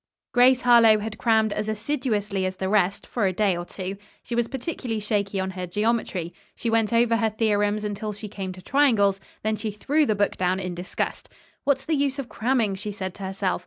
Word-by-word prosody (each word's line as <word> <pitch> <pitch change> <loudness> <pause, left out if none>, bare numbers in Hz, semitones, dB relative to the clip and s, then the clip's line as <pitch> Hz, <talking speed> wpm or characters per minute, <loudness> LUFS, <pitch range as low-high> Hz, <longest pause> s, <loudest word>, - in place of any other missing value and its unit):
Grace 255 +1 +5
Harlowe 235 -3 +7
had 215 0 -5
crammed 220 0 +3
as 210 0 -2
assiduously 215 -5 -1
as 185 0 -1
the 190 - -3
rest, 200 -1 +1
for 215 -5 0
a - - +1
day 200 -1 +2
or 175 - -4
two. 190 +2 -6 0.3
She - - -6
was 235 0 +1
particularly 255 -4 -4
shaky 205 -2 -1
on 190 0 -2
her 185 -1 -5
geometry. 205 -3 -1 0.2
She 230 - -2
went 225 -1 +2
over 230 0 +3
her 225 -1 +2
theorems 210 -1 +1
until 210 +1 -3
she 210 +1 -7
came 195 -2 -5
to 185 0 -13
triangles, 220 -9 +3 0.2
then 215 0 0
she 220 - -3
threw 285 +9 +1
the 215 - +2
book 205 0 0
down 185 +1 +1
in 180 -1 -4
disgust. 175 +2 -4 0.4
"What's 270 -1 +1
the 320 - 0
use 280 -2 +1
of 275 -3 -5
cramming?" 230 -3 +1
she 205 +2 -5
said 190 -2 -5
to 200 - -10
herself. 190 0 -1
210 Hz, 210 wpm, -25 LUFS, 195-235 Hz, 0.4 s, Harlowe